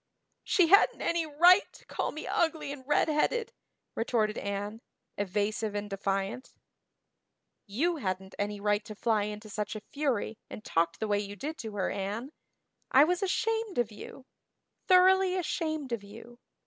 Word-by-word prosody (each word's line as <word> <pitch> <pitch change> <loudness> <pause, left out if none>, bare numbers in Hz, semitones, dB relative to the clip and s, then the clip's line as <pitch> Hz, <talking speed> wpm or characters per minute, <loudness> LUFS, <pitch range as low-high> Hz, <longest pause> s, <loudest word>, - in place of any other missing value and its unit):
"She 350 -4 +3
hadn't 400 +3 +5
any 335 -1 0
right 350 +6 +5
to - - -17
call - - -2
me 310 - -7
ugly 320 -4 0
and 285 -2 -8
redheaded," 310 +10 +1 0.4
retorted 220 -2 0
Anne, 205 +2 -4 0.3
evasive 205 +2 -1
and 205 0 -4
defiant. 195 +4 -3 1.1
"You 320 - 0
hadn't 190 -5 -4
any 205 0 -2
right 205 +1 +1
to 215 - -8
fly 215 -1 +1
into 210 +1 -6
such 210 0 -4
a - - -4
fury 260 -7 -1
and 215 - -9
talk 165 0 +1
the 220 - -2
way 205 -1 +2
you 205 0 -5
did 300 +10 -5
to 220 -2 -6
her, 195 - -1
Anne. 205 +7 -4 0.6
I 270 - +7
was 355 +4 +1
ashamed 445 +1 -1
of 240 -2 +1
you 255 +5 -11 0.6
thoroughly 375 0 +5
ashamed 315 -5 -2
of 235 -3 -2
you. 230 +4 -13
225 Hz, 155 wpm, -30 LUFS, 205-315 Hz, 1.1 s, I